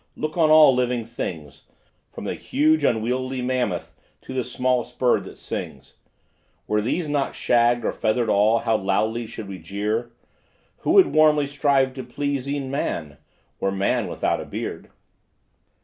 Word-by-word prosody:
look 155 0 -4
on 165 -3 +3
all 155 -3 +8
living 125 -2 0
things, 80 - -7 0.5
From - - -8
the - - -2
huge 310 +4 +1
unwieldy 125 +3 0
mammoth 125 -8 -2 0.3
to - - -9
the 130 -1 -1
smallest 125 0 -1
bird 125 -1 +2
that - - -11
sings; - - -7 0.7
Were 105 0 +1
these 155 +9 -1
not 145 -2 -1
shagged 120 0 +2
or - - +1
feathered 110 +2 0
all, 110 +2 +4
how 110 -1 +1
loudly 110 +4 -1
should 110 -1 -8
we 95 -1 -7
jeer; 105 +4 -3 0.7
Who - - -4
would 390 -2 +6
warmly 155 -1 +5
strive 140 -2 +1
to 130 -1 -6
please 140 +2 -3
e'en 140 -2 -3
man, 80 - -3 0.4
were 95 - 0
man 95 0 0
without - - -1
a - - -7
beard? - - -6
125 Hz, 155 wpm, -23 LUFS, 110-140 Hz, 0.7 s, all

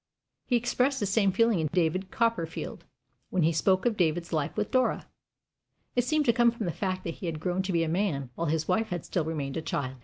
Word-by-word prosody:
He 250 - +2
expressed 250 +3 +1
the 205 - 0
same 200 0 +2
feeling 230 0 +3
in 160 - +1
David 185 +2 0
Copperfield, 230 -9 -2 0.4
when 185 -3 +1
he 165 - +4
spoke 185 +5 +2
of 230 -3 +1
David's 170 0 0
life 155 +3 -1
with 210 -1 -1
Dora. 255 -1 +1 0.9
It 245 - +3
seemed 305 +1 +2
to 235 - +4
come 240 0 +5
from 230 -2 -4
the 175 - 0
fact 185 +1 -3
that 165 - -3
he 180 - -3
had 160 -2 -3
grown 180 +3 0
to 190 0 -3
be 170 -2 +2
a - - -1
man, 160 -7 -1
while 165 +6 -2
his 155 +1 0
wife 225 0 +1
had 175 -4 -4
still 170 -4 -1
remained 145 -4 -3
a - - -1
child. 130 -4 -3
185 Hz, 235 wpm, -28 LUFS, 160-225 Hz, 0.9 s, come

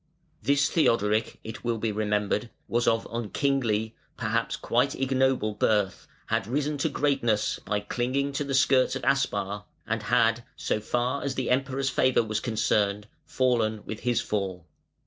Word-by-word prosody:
This 140 +4 +3
Theodoric, 115 - +1
it 110 0 -8
will 120 -1 0
be 110 0 -1
remembered, 105 +1 0 0.2
was 120 +1 0
of 115 0 +2
unkingly, 115 -1 0 0.2
perhaps - - -1
of - - -15
quite 125 +4 +2
ignoble, 130 -4 +1
birth, 105 -2 0 0.2
had - - -1
risen 145 +3 -1
to 160 - +1
greatness 135 -7 +1
by 105 -1 -1
clinging 130 +6 -1
to 140 - -1
the 140 -1 -2
skirts 130 -1 +4
of - - -5
Aspar, 105 -7 0 0.2
and - - -1
had, - - +2
so - - -1
far 120 +5 -1
as 140 -1 -2
the 130 -2 -1
Emperor's 135 +1 0
favour 130 -2 +3
was 110 -1 -2
concerned, 105 -3 0 0.2
fallen 115 -4 +1
with 110 - -5
his 120 -2 +1
fall. 95 -4 -3
120 Hz, 155 wpm, -27 LUFS, 105-135 Hz, 0.2 s, skirts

